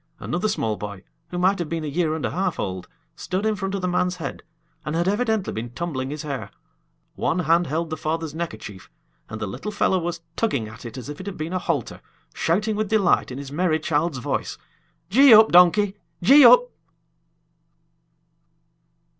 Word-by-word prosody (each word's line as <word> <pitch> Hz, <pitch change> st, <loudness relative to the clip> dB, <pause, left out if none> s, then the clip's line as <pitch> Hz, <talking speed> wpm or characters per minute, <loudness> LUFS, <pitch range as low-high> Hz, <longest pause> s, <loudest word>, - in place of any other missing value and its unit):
Another 180 Hz, +5 st, -2 dB
small 110 Hz, -, -1 dB
boy, 100 Hz, -2 st, -7 dB, 0.3 s
who 175 Hz, -, -5 dB
might 185 Hz, +2 st, +2 dB
have 170 Hz, -3 st, -3 dB
been 165 Hz, -1 st, -3 dB
a -, -, -4 dB
year 155 Hz, +1 st, 0 dB
and 160 Hz, -, -3 dB
a -, -, -2 dB
half 190 Hz, +3 st, -2 dB
old, 95 Hz, -2 st, -4 dB, 0.3 s
stood 190 Hz, +3 st, -3 dB
in 220 Hz, -1 st, +1 dB
front 195 Hz, -1 st, -3 dB
of 190 Hz, -, -4 dB
the -, -, +1 dB
man's 180 Hz, 0 st, 0 dB
head, 160 Hz, -6 st, -6 dB, 0.4 s
and 150 Hz, -, -3 dB
had 170 Hz, +2 st, 0 dB
evidently 220 Hz, 0 st, 0 dB
been 115 Hz, +2 st, -5 dB
tumbling 130 Hz, -1 st, -4 dB
his 150 Hz, +2 st, -5 dB
hair. 140 Hz, -6 st, -5 dB, 0.6 s
One -, -, -1 dB
hand 170 Hz, 0 st, +2 dB
held 160 Hz, +3 st, -2 dB
the 155 Hz, -, -3 dB
father's 160 Hz, -1 st, -3 dB
neckerchief, 160 Hz, -, -7 dB, 0.4 s
and 110 Hz, -, -6 dB
the 110 Hz, -, -2 dB
little 100 Hz, -, -6 dB
fellow 190 Hz, -2 st, +1 dB
was 170 Hz, -1 st, -4 dB
tugging 140 Hz, -, -1 dB
at 110 Hz, +2 st, -10 dB
it 115 Hz, -, -10 dB
as 130 Hz, -, -7 dB
if 145 Hz, 0 st, -7 dB
it 190 Hz, -, -8 dB
had 200 Hz, -, -6 dB
been 155 Hz, +3 st, -4 dB
a 185 Hz, -, 0 dB
halter, 160 Hz, -9 st, -3 dB, 0.3 s
shouting 210 Hz, +6 st, 0 dB
with 215 Hz, -1 st, -2 dB
delight 205 Hz, -5 st, +2 dB
in 130 Hz, -, -7 dB
his 140 Hz, -1 st, -8 dB
merry 160 Hz, 0 st, +1 dB
child's 155 Hz, -1 st, -1 dB
voice: 125 Hz, -, -3 dB, 0.5 s
"Gee 260 Hz, +1 st, +8 dB
up, 220 Hz, +1 st, +7 dB
donkey! 190 Hz, +3 st, +5 dB, 0.3 s
Gee 280 Hz, +10 st, +8 dB
up!" -, -, +7 dB
170 Hz, 190 wpm, -23 LUFS, 145-195 Hz, 0.6 s, Gee